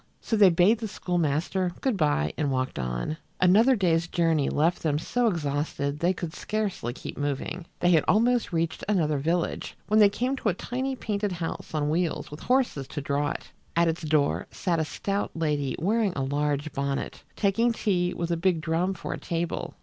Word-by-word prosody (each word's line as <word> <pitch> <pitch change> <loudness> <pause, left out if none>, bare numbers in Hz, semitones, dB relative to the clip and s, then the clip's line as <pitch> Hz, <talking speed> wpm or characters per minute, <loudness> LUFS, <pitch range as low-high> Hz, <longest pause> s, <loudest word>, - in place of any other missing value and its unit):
So 225 - -1
they 205 -3 +7
bade 180 +6 +4
the 225 - -3
schoolmaster 175 -1 -1
good 260 -4 0
by 145 - +1
and 145 -2 0
walked 130 - -1
on. 60 - -2 0.2
Another 215 +9 +5
day's 170 -5 +2
journey 165 -5 +1
left 165 +4 +1
them 150 -3 +1
so 240 +9 0
exhausted 145 -4 -1
they 175 +3 +3
could 170 -3 -5
scarcely 205 - -2
keep 130 - -8
moving. 145 +5 -3
They 175 - +4
had 160 -3 +5
almost 235 +3 +3
reached 165 -1 -1
another 155 -8 +2
village 165 +4 -1
when 215 +1 +3
they 205 -1 +8
came 250 +6 -1
to 225 - 0
a 180 - 0
tiny 260 +6 -3
painted 205 -5 -2
house 165 -2 -5
on 150 -1 0
wheels 170 -1 -1
with 150 - -8
horses 245 - +1
to 145 - -5
draw 145 +1 0
it. - - -6 0.2
At 170 0 +4
its 165 +1 -1
door 150 -2 +1
sat 175 -4 -1
a 160 - +1
stout 200 +5 -2
lady 150 -4 0
wearing 210 +2 +1
a 135 - -1
large 145 +2 -1
bonnet, 140 0 -3
taking 225 +4 +2
tea 180 -6 0
with 170 0 -2
a 170 - +1
big 175 -1 +2
drum 170 +4 0
for 170 - -5
a - - -6
table. 170 0 -3
170 Hz, 190 wpm, -27 LUFS, 150-200 Hz, 0.2 s, they